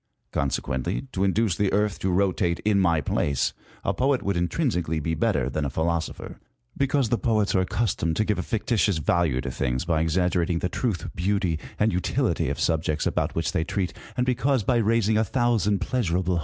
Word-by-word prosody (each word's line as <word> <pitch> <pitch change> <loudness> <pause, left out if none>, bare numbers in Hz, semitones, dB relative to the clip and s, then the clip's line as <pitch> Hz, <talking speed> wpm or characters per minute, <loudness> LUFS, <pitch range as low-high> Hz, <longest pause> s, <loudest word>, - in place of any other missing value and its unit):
Consequently, 70 - -2
to 95 - -1
induce 100 -1 +2
the 100 +2 +1
Earth 105 0 +1
to 95 - -1
rotate 90 -1 +1
in 105 -2 +3
my 85 -4 +3
place, 70 -1 0 0.3
a - - 0
poet 135 0 +1
would 100 -1 0
intrinsically 85 - 0
be 80 +2 -2
better 80 - +1
than 75 - -2
a 70 - -1
philosopher: 80 +3 -3 0.4
because 140 -3 +1
the 120 - +1
poets 110 -4 +1
are 95 - +3
accustomed 90 -4 0
to 110 - +1
give 105 -3 0
a - - +1
fictitious 100 -2 0
value 80 -3 +1
to 65 -1 -4
things 65 +3 -1
by 80 -2 +1
exaggerating 85 +1 +1
the 90 - -1
truth, 110 -7 -2
beauty, 90 -3 0 0.2
and 110 +1 +2
utility 90 - 0
of - - -3
subjects 80 -1 0
about - - -1
which 80 0 0
they 80 - 0
treat, 90 +2 -2 0.2
and 125 - +2
because 130 -1 +1
by 120 +4 +2
raising 110 -1 +2
a - - +3
thousand 110 -3 +1
pleasurable. 90 -7 0
95 Hz, 185 wpm, -25 LUFS, 80-110 Hz, 0.4 s, in